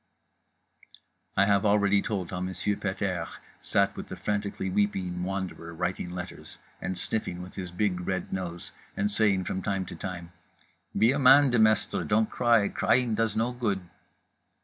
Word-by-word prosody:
I 100 - +6
have 100 -1 +3
already 100 -1 +4
told 95 -5 -3
how 90 - -3
Monsieur 95 +2 -1
Pet 100 +1 -3
airs 85 -6 -2 0.2
sat 100 0 +1
with - - -7
the - - -6
frantically 100 -2 -2
weeping 95 -2 0
Wanderer 90 -3 -4
writing 90 +1 -2
letters, 90 0 -8 0.2
and 90 -1 -3
sniffing 90 -2 -2
with 90 - -11
his 90 -2 -5
big 90 -1 -1
red 95 -1 -2
nose, 85 -2 -5 0.3
and 105 +1 +1
saying 100 -3 +2
from 95 - -3
time 95 -1 -1
to - - -8
time: 85 -2 -6 0.7
"Be 115 +3 +5
a 140 - 0
man, 140 +1 +7
Demestre, 110 -3 +3
don't 110 +1 +1
cry, 115 -4 +3
crying 125 -3 +2
does 110 -1 0
no 115 +3 +1
good." 115 -6 -1
100 Hz, 160 wpm, -28 LUFS, 90-105 Hz, 0.7 s, man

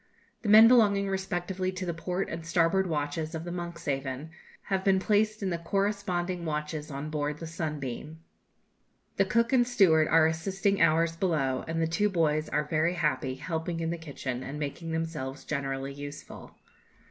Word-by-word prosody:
The 215 - -2
men 220 +2 +10
belonging 205 -5 +4
respectively 190 -1 -2
to 185 0 -4
the 170 - -2
port 180 +3 -2
and 165 0 -5
starboard 170 +3 +2
watches 155 +1 -2
of 160 - -4
the 175 - -5
'Monkshaven' 150 -5 -4 0.3
have 190 -1 -1
been 195 -1 +4
placed 215 +2 +1
in 190 - 0
the 170 - -2
corresponding 185 -1 -1
watches 150 -1 -3
on 145 +2 -5
board 150 -1 -2
the 165 - -7
'Sunbeam.' 155 -2 -5 1.0
The 195 - +4
cook 230 +5 +1
and 245 -2 +4
steward 180 -10 +4
are 160 0 +5
assisting 190 +5 0
ours 165 0 +3
below, 150 -8 0
and 165 0 -2
the 165 - +2
two 185 +6 +1
boys 155 -4 +1
are 150 - +1
very 155 +3 0
happy, 150 -5 0
helping 165 +3 -3
in 165 0 -1
the 170 - -3
kitchen, 135 -5 -5
and 140 +3 -6
making 155 +3 -4
themselves 160 -5 -4
generally 135 -2 -3
useful. 145 0 -9
165 Hz, 170 wpm, -29 LUFS, 150-190 Hz, 1.0 s, men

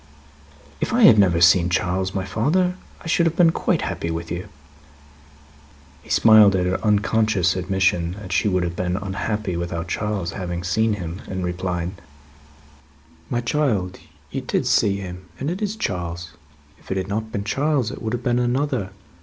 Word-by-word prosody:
"If - - -2
I 240 0 +3
had 110 - +8
never 90 -4 +4
seen 85 +1 +5
Charles, 95 +1 -1
my 95 -1 -1
father, 155 - +1 0.3
I - - -15
should 170 +1 +3
have 165 - -1
been 170 -1 +5
quite - - 0
happy 85 - -3
with 85 0 -4
you." 85 +1 -5 1.5
He - - -18
smiled 110 -3 +6
at 90 -1 +1
her 90 +1 -1
unconscious 105 -3 +2
admission 90 -2 0
that 100 -1 -9
she 90 - +2
would 90 -3 +1
have 85 -1 -3
been 90 0 -1
unhappy 100 0 -3
without 85 0 -3
Charles, 100 -2 -2
having 90 -2 -4
seen 110 +5 +1
him; 90 -2 -5
and 95 -2 -3
replied: 90 -1 -2 1.4
"My 120 - -1
child, 115 -9 -1 0.3
you - - -3
did - - -1
see 100 -1 +2
him, 90 -1 -8
and 140 +4 -2
it 185 +4 -5
is 210 0 -1
Charles. 85 - -4 0.5
If - - -19
it 95 - -1
had 95 0 -2
not 110 +2 -3
been 100 - -3
Charles, 135 +2 0
it - - -8
would 110 0 -3
have 120 0 -3
been 120 -1 +1
another. 125 -3 0
95 Hz, 175 wpm, -22 LUFS, 90-115 Hz, 1.5 s, had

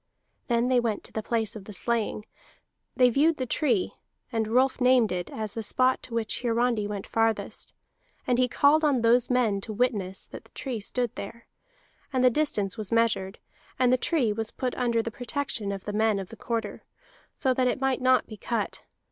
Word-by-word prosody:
Then 235 0 +2
they 255 -1 +4
went 225 -3 -1
to - - -9
the 220 - -2
place 225 -1 -1
of 205 -3 -9
the 210 - -9
slaying; 220 +1 -1 0.7
they 250 -1 +5
viewed 305 +5 +3
the 255 - -2
tree, 240 - +1 0.4
and 225 -2 0
Rolf 255 +3 +2
named 250 -3 +4
it 180 -1 -3
as 215 -2 -5
the 225 - -3
spot 255 +4 +2
to 235 - -8
which 225 -2 -1
Hiarandi 235 -3 +1
went 205 -2 -5
farthest; 225 0 -1 0.5
and 245 0 +1
he 255 - +4
called 290 +5 +4
on 280 -5 +3
those 235 +1 +4
men 230 -6 +2
to 220 - -6
witness 205 -5 -1
that - - -10
the - - -22
tree 255 -5 -4
stood 240 +3 -2
there; 230 +4 -8 0.7
and 260 -2 +1
the 255 - +6
distance 225 -7 0
was 210 0 -4
measured, 225 -4 +1 0.4
and 255 -1 +3
the - - +7
tree 255 -4 +1
was 220 0 -2
put 250 0 -3
under 235 -2 0
the 230 - -4
protection 245 -4 -3
of 195 -1 -6
the 210 - -4
men 215 0 +2
of 195 -2 -5
the - - -10
Quarter, 225 -2 -4 0.5
so 260 -2 +2
that 255 0 +1
it 250 - 0
might 270 -1 0
not 255 0 +4
be 215 - -10
cut. 220 +1 -3
235 Hz, 200 wpm, -27 LUFS, 215-255 Hz, 0.7 s, the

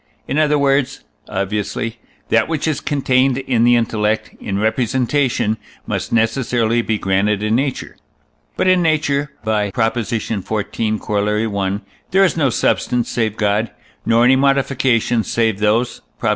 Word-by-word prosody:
in 145 - 0
other 150 -1 +3
words 135 -1 +1 0.3
(obviously), 105 +4 -3 0.3
that 115 0 +3
which 160 -1 -2
is 150 -2 -1
contained 130 -2 +1
in 130 -3 0
the 120 0 +5
intellect 110 -2 0
in 100 -1 -3
representation 120 +1 0 0.3
must - - -3
necessarily 115 0 +1
be 110 -2 -1
granted 100 +1 0
in 110 +1 0
nature. 135 +1 -2 0.6
But - - +1
in 185 -1 +4
nature 150 -3 +1
(by 105 -2 0
Prop. 110 +1 0
xiv., 110 -2 -2 0.6
Coroll. 105 -1 -1
i.) - - -12 0.3
there 190 +2 +4
is 190 - +2
no 145 -5 +2
substance 120 0 0
save 110 -2 -1
God, 105 +1 +1 0.3
nor 115 +1 +3
any 130 +2 +6
modifications 130 -4 +1
save 110 -4 +1
those 110 +4 +1 0.2
(Prop. - - -1
115 Hz, 145 wpm, -18 LUFS, 110-135 Hz, 0.6 s, any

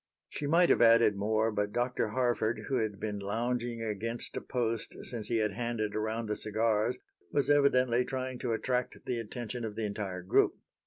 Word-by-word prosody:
She 145 - -4
might 170 +3 +5
have - - +4
added 115 -2 +6
more, 110 +2 +1
but 105 -1 -1
Dr. 120 0 0
Harford, 120 -1 0
who 135 - +1
had 110 -4 -2
been 105 -2 -3
lounging 115 +3 -2
against 115 +2 -3
a - - -2
post 115 -3 -2
since 115 -4 -4
he 115 - +1
had 105 -2 +1
handed 115 -1 -2
around 110 +2 -1
the 105 0 -2
cigars, 110 0 +1 0.3
was 145 -1 +2
evidently 130 -4 +4
trying 130 -1 -4
to 120 -2 -1
attract 125 +2 -1
the 120 -2 -1
attention 120 +1 -5
of 110 -2 -4
the 110 0 -2
entire 100 -3 -4
group. 90 - +3
115 Hz, 180 wpm, -31 LUFS, 105-125 Hz, 0.3 s, added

